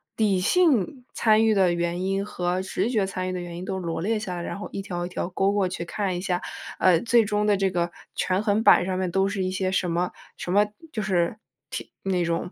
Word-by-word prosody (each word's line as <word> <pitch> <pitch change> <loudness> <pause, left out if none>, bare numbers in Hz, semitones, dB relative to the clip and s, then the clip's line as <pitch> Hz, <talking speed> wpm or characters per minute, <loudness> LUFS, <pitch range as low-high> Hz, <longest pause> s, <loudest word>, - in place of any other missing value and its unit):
理 205 -4 +2
性 255 - +2
参 220 0 +4
与 220 - +4
的 185 -3 +4
原 170 +1 -1
因 195 +1 0
和 180 -2 -1
直 190 +2 -1
觉 215 -5 +2
参 185 -1 -3
与 - - -2
的 180 - -3
原 175 -1 -7
因 180 - -6
都 190 - -3
罗 170 -3 -3
列 215 +4 0
下 190 -4 -4
来， 175 - -4
然 - - -5
后 205 - -6
一 - - -4
条 175 -3 -4
一 - - -6
条 180 - -3
勾 195 +2 +1
过 200 -2 +2
去 175 -1 -4
看 190 +1 -2
一 - - -4
下， 180 -1 0 0.4
呃， 180 -3 +5
最 235 -1 +4
终 210 0 0
的 205 -1 +4
这 190 -1 +1
个 175 -1 0 0.2
权 185 +1 +1
衡 210 +1 +2
板 - - +8
儿 - - -1
上 185 0 -1
面 185 - 0
都 195 +2 +2
是 195 -1 -2
一 185 - 0
些 185 0 -1
什 185 -1 0
么 175 +2 0 0.3
什 180 - -3
么 205 +1 +5 0.2
就 220 - -3
是 185 0 +1 0.3
提 - - -6
那 185 -2 +1
种 170 +1 -2
190 Hz, 275 characters per minute, -25 LUFS, 180-205 Hz, 0.4 s, 板